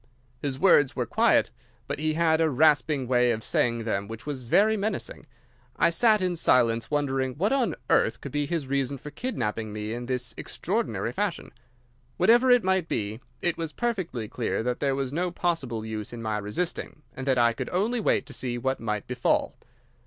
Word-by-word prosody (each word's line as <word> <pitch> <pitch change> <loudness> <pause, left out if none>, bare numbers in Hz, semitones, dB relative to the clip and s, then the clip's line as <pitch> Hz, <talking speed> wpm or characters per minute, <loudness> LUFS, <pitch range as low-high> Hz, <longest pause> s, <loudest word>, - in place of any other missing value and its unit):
"His 140 -2 -2
words 145 -4 +4
were - - -1
quiet, - - +3 0.3
but - - -4
he 155 0 0
had 160 -1 +3
a 160 - +3
rasping 145 -1 +3
way 125 -1 +3
of 110 -2 -1
saying 115 +1 +1
them 100 -3 -2
which 110 +1 -8
was 145 -3 -4
very 210 - +4
menacing. 215 +1 -3 0.5
I 170 - +3
sat 215 +2 +3
in 180 -1 0
silence 115 -7 +3
wondering 135 -3 0
what 200 - +1
on 265 -3 +1
earth - - +2
could - - -7
be 145 -1 -1
his 165 -2 -2
reason 140 0 -1
for 150 +3 -9
kidnapping 115 - -3
me 105 +1 -4
in 120 +1 -5
this 125 -1 -2
extraordinary - - -2
fashion. - - -3 0.7
Whatever 240 +7 +5
it 245 -1 +6
might 190 -2 +1
be, 105 +1 -2 0.2
it 175 -1 0
was 165 -2 -4
perfectly 185 - -2
clear 115 0 -2
that 125 0 -2
there 140 -2 +1
was 135 -1 -3
no 180 +3 0
possible 140 -11 -2
use 110 -1 -5
in 120 - -7
my 110 -1 -1
resisting, 145 - -4
and 130 +1 -6
that 130 -1 +3
I 120 -1 +4
could - - -5
only 215 +7 0
wait 215 - +1
to 140 - -10
see 125 -1 -3
what 130 +2 -1
might 105 -2 -3
befall. 125 -1 0
135 Hz, 190 wpm, -26 LUFS, 120-170 Hz, 0.7 s, it